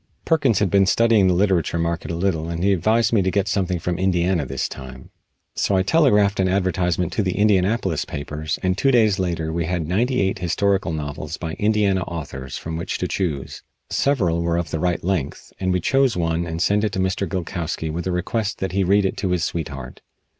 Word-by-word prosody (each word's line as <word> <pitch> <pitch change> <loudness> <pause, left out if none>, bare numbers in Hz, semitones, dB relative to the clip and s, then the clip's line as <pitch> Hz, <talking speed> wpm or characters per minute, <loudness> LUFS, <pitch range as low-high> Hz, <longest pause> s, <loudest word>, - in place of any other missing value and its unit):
Perkins 140 - +2
had 100 -2 +1
been 100 -1 +4
studying 115 -2 +4
the 90 - +3
literature 90 -3 +1
market 85 -1 -2
a 85 - -2
little 85 -3 -1
and 85 +1 -3
he 100 0 +4
advised 110 +6 +2
me 105 - +4
to 95 - +1
get 100 +1 0
something 95 -2 0
from 85 +1 -3
Indiana 90 -4 +1
this 65 0 -2
time, 65 -1 -10 0.4
so 100 - 0
I 95 - +2
telegraphed 105 - +3
an 95 - +3
advertisement 90 -2 0
to - - +1
the 95 -3 -1
Indianapolis 100 -3 +2
papers 75 +2 -4
and 90 0 +1
two 135 +8 +2
days 110 -6 +3
later 85 -3 -2
we 85 0 -1
had 85 -2 -2
ninety 120 +9 +1
eight 95 0 0
historical 95 +1 0
novels 75 0 -5
by 80 -2 -5
Indiana 105 -3 +2
authors 70 -7 -6
from 80 0 -5
which 85 +2 -3
to 90 - -2
choose. 80 -9 -3 0.3
Several 95 -13 +1
were 85 0 0
of 85 -2 -3
the 80 - -2
right 90 0 0
length, 85 -6 -3
and 95 -1 0
we 90 - +1
chose 135 +3 +2
one 85 0 0
and 80 +1 -2
sent 105 +1 +2
it 105 - 0
to - - -2
Mr. 95 0 -1
Gilkowsky 85 -3 -3
with 85 +3 -4
a - - 0
request 100 +4 -2
that 95 - -3
he 95 +1 +1
read 100 +2 +3
it 95 - -1
to 95 - -1
his 90 -2 0
sweetheart. 70 -7 -5
90 Hz, 210 wpm, -22 LUFS, 85-100 Hz, 0.4 s, been